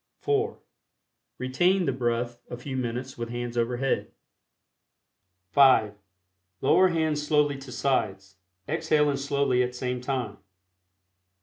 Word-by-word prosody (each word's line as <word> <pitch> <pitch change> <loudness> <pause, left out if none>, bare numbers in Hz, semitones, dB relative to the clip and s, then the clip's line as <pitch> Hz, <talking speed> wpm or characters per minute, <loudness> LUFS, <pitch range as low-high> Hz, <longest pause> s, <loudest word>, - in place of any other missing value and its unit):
(4) 425 +1 0 0.8
Retain 175 +9 +2
the 135 - +1
breath 120 -1 -2
a 120 - -6
few 130 +2 -6
minutes 125 +1 -4
with 115 0 -4
hands 120 0 -4
over 120 +1 0
head. 135 +1 -1 1.4
(5) 130 -7 +5 0.7
Lower 185 - +5
hands 160 -4 0
slowly 150 -2 +1
to 135 -2 -10
sides, 95 -7 -1 0.3
exhaling 150 -2 +1
slowly 140 -2 +1
at 125 0 -1
same 125 0 -3
time. 125 -5 -3
130 Hz, 115 wpm, -27 LUFS, 120-145 Hz, 1.4 s, 5